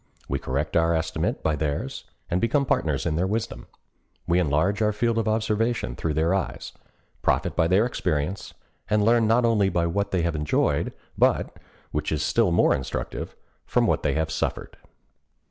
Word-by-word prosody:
We 70 - -1
correct 70 +4 -2
our 85 0 +3
estimate 80 0 -2
by 80 - +1
theirs, 75 -1 -3 0.2
and 90 - 0
become 140 +5 +2
partners 75 - 0
in 80 -2 0
their 90 +3 +1
wisdom. 110 +3 -3 0.6
We 85 +1 +2
enlarge 90 +6 +1
our 105 0 +3
field 115 +2 +1
of 115 - -1
observation 110 +2 0
through 80 -2 -2
their 80 +3 +2
eyes, 95 -1 -3 0.5
profit - - +1
by 80 - +3
their 95 +6 +4
experience, 90 -5 -2 0.3
and 105 -1 +3
learn 115 0 +4
not 120 +2 +3
only 105 -4 +3
by 85 -2 0
what 100 +5 -1
they 90 -3 0
have 85 -2 0
enjoyed, 75 -1 0 0.3
but—which 75 +1 -1
is 80 - 0
still - - +2
more 85 - +4
instructive—from 65 - -3
what - - +1
they - - 0
have 80 0 -1
suffered. - - -3
90 Hz, 165 wpm, -25 LUFS, 80-110 Hz, 0.6 s, their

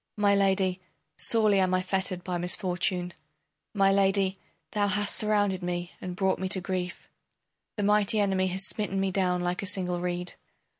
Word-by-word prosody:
My 205 -1 +3
Lady, 190 -2 +1 0.3
sorely 215 -3 +3
am 185 -1 +2
I 185 - 0
fettered 190 -1 -2
by 180 -1 -3
misfortune; 180 0 0 0.6
My 195 -1 +4
Lady, 195 -1 +2 0.3
thou 205 -1 +1
hast 205 +1 +1
surrounded 205 -3 +1
me, 175 0 -3
and 180 -1 -5
brought 190 0 0
me 190 0 -2
to 190 - +3
grief. 185 -1 -4 0.7
The 205 - -1
mighty 210 +1 +3
enemy 190 -2 +1
has 190 +1 0
smitten 195 -1 -2
me 195 0 0
down 180 -2 0
like 180 +1 -2
a 200 - -3
single 180 -2 -1
reed. 180 0 -3
190 Hz, 165 wpm, -27 LUFS, 180-200 Hz, 0.7 s, My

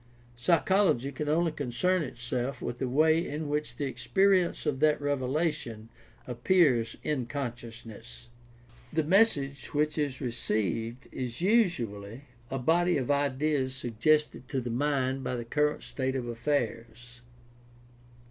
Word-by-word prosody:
Psychology 165 0 +2
can 145 +2 -4
only 165 +2 +2
concern 155 +7 0
itself 125 -1 -3
with 120 0 -5
the 130 - -1
way 155 +5 +4
in 155 -2 -4
which 150 +1 -2
the 145 - -2
experience 185 - +2
of 145 -3 0
that 155 0 +3
revelation 140 -5 -2 0.4
appears 125 -2 +2
in 135 -6 -1
conscious 120 -4 -6
ness. 115 +2 -11 0.6
The 160 0 +1
message 150 -6 +2
which 150 +1 +1
is 140 -3 -1
"received" 115 - -2
is 125 +2 -5
usually 125 - +1 0.3
a 135 - -2
body 170 +6 +2
of 130 0 -1
ideas 140 -1 0
suggested 130 +3 0
to 135 -2 -1
the 120 -1 -4
mind 135 0 0
by 125 - -2
the 120 -1 -4
current 150 +4 0
state 130 -1 -3
of 125 -2 -3
affairs. 120 -1 -3
135 Hz, 130 wpm, -29 LUFS, 120-155 Hz, 0.6 s, way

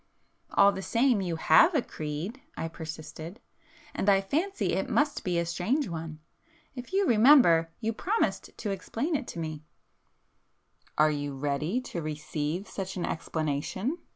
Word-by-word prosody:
"All 200 - +7
the 190 - -5
same, 230 +1 +2
you 175 -3 -2
have 160 - +5
a 285 - +4
creed;"—I 170 - -6
persisted—"And 160 +5 -7
I 195 -1 +6
fancy 325 - -1
it - - -1
must 290 -1 +1
be 180 -2 0
a 170 - +1
strange 205 - 0
one! 160 -2 -6 0.6
If 250 +2 -8
you 390 +1 +2
remember, 225 - +6
you 225 0 -1
promised 415 - -1
to 210 - -3
explain 230 - -2
it 275 -4 -2
to - - -7
me——" 155 -2 -5 1.3
"Are 155 0 +5
you 145 -2 -3
ready 145 - -1
to 185 -9 -5
receive 155 +3 -3
such 190 -1 -5
an 175 - -1
explanation?" 160 - -2
185 Hz, 145 wpm, -28 LUFS, 155-250 Hz, 1.3 s, All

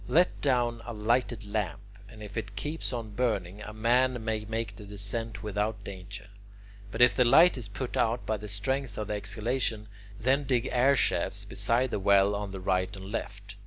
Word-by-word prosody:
Let 175 +3 +3
down 120 -4 +1
a 120 - -6
lighted 115 +1 0
lamp, 100 -3 -2 0.3
and 110 -2 -11
if 100 -1 -9
it 105 -3 -4
keeps 155 +7 -3
on 115 -4 -4
burning, 105 -5 -1
a 105 - -7
man 120 +2 +2
may 110 -1 -1
make 110 -2 -3
the 105 - -10
descent 105 +1 -5
without 105 0 -2
danger. 100 +1 -8 0.7
But 120 - +4
if 125 - +6
the 125 - +5
light 165 +9 +7
is 125 -5 -6
put 120 +5 -5
out 120 +1 +1
by 110 - 0
the 105 +1 -8
strength 120 +4 -2
of 105 -1 -4
the - - 0
exhalation, 110 +2 -2 0.3
then 135 +5 +2
dig 130 -2 +1
air 130 +3 +4
shafts - - +1
beside 120 +2 0
the - - -1
well 100 +1 +4
on 100 0 -3
the 95 -1 -6
right 95 0 0
and 95 +1 -8
left. 100 -2 -6
110 Hz, 195 wpm, -29 LUFS, 100-120 Hz, 0.7 s, light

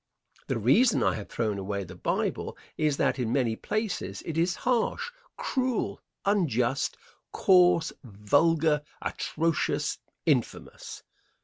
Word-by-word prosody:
The - - 0
reason 205 - +4
I - - +3
have 105 - -6
thrown 110 -4 -1
away 100 +1 -3
the 90 0 -10
Bible - - -2 0.2
is 150 -3 +1
that - - +1
in 115 -3 -1
many 120 -4 +1
places 215 - -3
it 165 - -4
is 170 +2 +1
harsh, 255 - +1 0.3
cruel, 255 -3 -1 0.2
unjust, 140 - +1 0.3
coarse, 180 -3 +4
vulgar, 150 +8 +2 0.2
atrocious, 165 +1 -1 0.3
infamous. - - -2
150 Hz, 115 wpm, -28 LUFS, 115-180 Hz, 0.3 s, reason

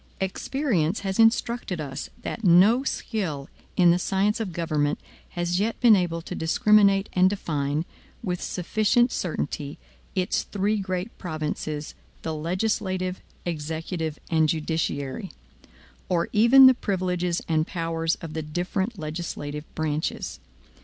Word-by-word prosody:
Experience 190 - 0
has 195 +1 -3
instructed 225 -4 +2
us 140 -2 -5
that 230 - -5
no 200 +8 +6
skill 170 - -3 0.3
in 175 -2 +6
the 175 - +2
science 195 +4 +1
of 215 -5 -3
government 155 -3 0 0.4
has 175 +1 0
yet 220 +3 -1
been 235 -3 +7
able 170 -3 -1
to - - -6
discriminate 200 +3 +4
and 185 0 +5
define, 150 -5 -1 0.4
with 180 -4 -2
sufficient 215 +6 +2
certainty, 150 -4 -3 0.4
its 185 -1 +1
three 205 +2 -1
great 185 +2 -3
provinces 155 -3 -4 0.3
the 160 - -2
legislative, 185 +2 -1 0.2
executive, 160 0 -3
and 160 -1 +3
judiciary; 160 +2 -2 0.8
or 175 -2 +1
even 235 +5 +8
the 260 - +9
privileges 180 -6 -1
and 160 0 +1
powers 165 -2 -1
of 165 -3 -7
the 160 - -2
different 180 +7 -2
legislative 155 -2 -5
branches. 155 0 -2
180 Hz, 125 wpm, -25 LUFS, 160-200 Hz, 0.8 s, the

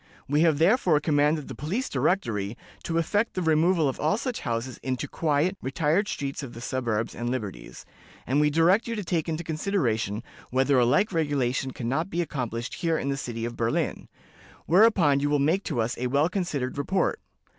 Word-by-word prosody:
We 145 +2 +2
have 160 -3 +4
therefore 175 - +4
commanded 150 0 +1
the - - -6
Police 200 - -3
Directory 115 - -1 0.3
to 165 - -1
effect 205 +7 0
the 185 - -1
removal 160 0 +3
of 135 - -3
all 155 +7 +1
such 250 0 -3
houses 120 0 -3
into 130 -1 -2
quiet, 160 +4 0
retired 155 +9 +1
streets 140 -5 -4
of 130 -5 -8
the - - -7
suburbs 120 -3 -2
and 120 0 -3
liberties, 115 -6 -5 0.4
and 135 +3 +1
we 150 - +4
direct 170 +9 +3
you 230 - -2
to 210 - -3
take 165 -2 -1
into 165 +1 -2
consideration 130 - -1 0.3
whether 130 +1 +3
a 120 - +4
like 150 - +2
regulation 135 -5 0
can 125 -2 -5
not 155 +9 -1
be 175 0 0
accomplished 120 -6 -4
here 165 -1 0
in 140 - -2
the 140 - 0
city 115 -4 -4
of 120 0 -5
Berlin; 115 0 -1 0.6
whereupon 175 -6 +5
you 145 +1 0
will 145 - +3
make 160 +8 +1
to 140 -7 -2
us 115 +1 0
a 125 - 0
well 140 +6 +2
considered 145 -9 -2
report. 190 +7 0
145 Hz, 190 wpm, -26 LUFS, 125-170 Hz, 0.6 s, whereupon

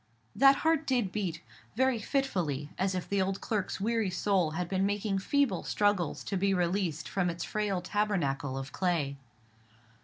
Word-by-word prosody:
That 275 +1 +7
heart 320 -2 +2
did 245 -8 +1
beat: 180 -6 -3 0.3
very 260 -1 +2
fitfully, 180 - -1
as 190 0 0
if 180 - -3
the 200 -1 +1
old 190 +1 -1
clerk's 210 -4 -2
weary 225 0 +1
soul 185 -2 +1
had 180 -1 -1
been 190 +1 0
making 205 0 0
feeble 255 -2 +1
struggles 205 -6 0
to 195 - -2
be 195 +1 +2
released 175 -2 0
from 180 -2 0
its 170 0 -4
frail 205 -4 -1
tabernacle 155 -10 -1
of 135 0 -5
clay. 160 -7 0
195 Hz, 160 wpm, -30 LUFS, 175-210 Hz, 0.3 s, That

